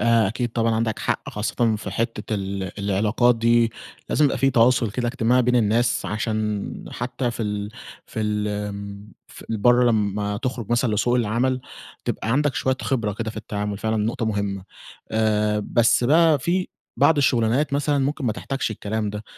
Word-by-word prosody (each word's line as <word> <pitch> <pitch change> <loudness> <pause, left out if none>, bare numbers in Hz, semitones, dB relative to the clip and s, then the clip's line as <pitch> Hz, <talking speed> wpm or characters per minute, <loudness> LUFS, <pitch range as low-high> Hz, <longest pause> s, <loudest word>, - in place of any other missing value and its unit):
آآ، 115 -3 +4
أكيد 120 +4 -2
طبعًا 115 -1 +1
عندك 110 -1 -1
حق - - -2
خاصة 110 +1 0
في 105 -1 -6
حتّة 110 +1 -2
ال 95 -2 -4
العلاقات 105 +5 +2
دي، 115 0 +3 0.4
لازم 150 - +3
يبقى 140 - +1
في 135 - +3
تواصل 120 -1 +3
كده 120 +3 -2
إجتماعي 125 0 +2
بين 125 +1 +2
الناس 120 +2 +2
عشان 105 -1 -2
حتّى 125 0 -3
في 115 - -4
ال 105 -1 -3 0.4
في 110 - -5
ال 105 -1 -1
آمم، 100 0 -6
في - - -13
برّه 120 +3 +4
لمّا 105 -1 0
تخرج 125 -2 -4
مثلًا 120 -2 +2
لسوق 120 +4 +1
العمل، 125 +2 +1 0.4
تبقى 110 - -2
عندك 145 +1 +1
شويّة 130 0 0
خبرة 115 -7 0
كده 110 +2 -4
في 110 - -13
التعامل 105 -1 -4
فعلًا 110 +1 -1
نقطة 110 +2 -1
مهمّة. 100 -3 -2 0.5
آآ، 105 -1 +1
بس 120 +1 +3
بقى 160 +3 +5
في 180 +7 -1 0.3
بعض 160 - +4
الشغلانات 130 +1 +2
مثلًا 145 0 +1
ممكن 140 +1 -1
ما 115 - +1
تحتاجش 135 +3 -3
الكلام 105 0 -3
ده، 105 +1 -6
115 Hz, 170 wpm, -23 LUFS, 105-125 Hz, 0.5 s, بقى